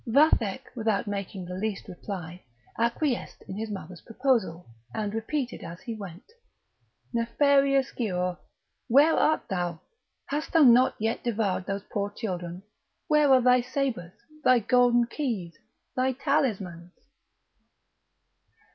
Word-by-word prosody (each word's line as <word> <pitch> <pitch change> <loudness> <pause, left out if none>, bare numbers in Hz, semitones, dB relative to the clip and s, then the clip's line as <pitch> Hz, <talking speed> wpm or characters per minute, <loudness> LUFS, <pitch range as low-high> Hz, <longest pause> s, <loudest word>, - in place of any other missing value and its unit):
Vathek, 240 -4 +3
without 220 -3 0
making 200 -2 -4
the 180 - -7
least 200 +2 -3
reply, 180 -1 -7 0.4
acquiesced 235 +3 -1
in 190 - -6
his 220 +2 -4
mother's 185 -4 -7
proposal, 225 -9 0 0.3
and 210 -1 -2
repeated 240 +3 -3
as 170 +1 -8
he 235 -4 -5
went: 195 -4 -9 0.9
"Nefarious 275 +3 +3
Giaour! 180 -6 -2 0.5
where 285 +6 +6
art 310 - +2
thou! 175 -4 -2 0.5
hast 295 +2 -4
thou 325 -2 +6
not 250 0 +6
yet 225 +1 -2
devoured 205 -6 -1
those 200 0 -3
poor 200 -1 -1
children? 180 -4 -4 0.5
where 300 -2 +4
are 260 -1 +7
thy 250 0 +5
sabres? 240 -9 -3 0.3
thy 255 - +6
golden 240 +1 +4
key? 230 - -3 0.4
thy 260 +1 +1
talismans?" 200 - -1
225 Hz, 120 wpm, -27 LUFS, 190-255 Hz, 0.9 s, are